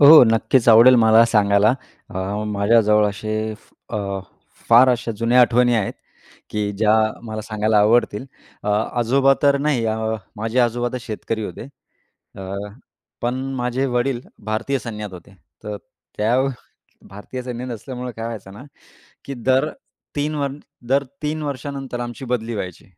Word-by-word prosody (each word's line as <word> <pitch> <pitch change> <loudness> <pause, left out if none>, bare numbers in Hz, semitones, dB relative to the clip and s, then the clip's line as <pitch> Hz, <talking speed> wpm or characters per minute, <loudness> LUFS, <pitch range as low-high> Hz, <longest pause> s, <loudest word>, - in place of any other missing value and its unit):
हो. 150 +1 +10
नक्कीच 115 +2 +2
आवडेल 115 +3 +8
मला 110 0 +6
सांगायला. 105 0 +3 0.4
अ, 95 - -5 0.3
माझ्याजवळ 105 0 +3
असे 110 +2 -6 0.6
अ, - - -1 0.7
फार 120 +3 +7
अशा 120 -2 0
जुन्या 120 +2 +4
आठवणी 120 0 +4
आहेत, 105 -4 0 0.6
की 105 -1 -1
ज्या 105 +1 +2 0.3
मला 110 -2 -5
सांगायला 110 0 +1
आवडतील. 105 +2 +2 0.4
अ, - - -4 0.3
आजोबा 135 +4 +4
तर 140 -1 +5
नाही. 140 -5 0
अ, 110 0 0 0.4
माझे 110 +3 -2
आजोबा 120 0 +1
तर 125 - -3
शेतकरी 110 -1 -4
होते. 115 - -7 0.7
अ, - - -8 0.8
पण 120 +1 0 0.2
माझे 125 +2 -1
वडील 125 0 0 0.2
भारतीय 110 +6 -1
सैन्यात 105 -5 -7
होते. 90 +2 -13 0.3
तर 105 -1 -4 0.4
त्या 110 +3 +2 0.7
भारतीय 105 +6 -8
सैन्यात 125 0 -6
असल्यामुळे 125 +2 -6
काय 115 - -5
व्हायचं 105 -4 -7
ना, 105 - -11 0.6
की 140 - -6
दर 130 +4 +1 0.5
3 150 +2 -1
वर 140 -1 -1 0.4
दर 140 +1 +2 0.2
3 155 +1 -2
वर्षानंतर 135 -2 -5
आमची 120 +2 -6
बदली 120 -1 -2
व्हायची, 90 -4 -6
115 Hz, 140 wpm, -21 LUFS, 110-130 Hz, 0.8 s, हो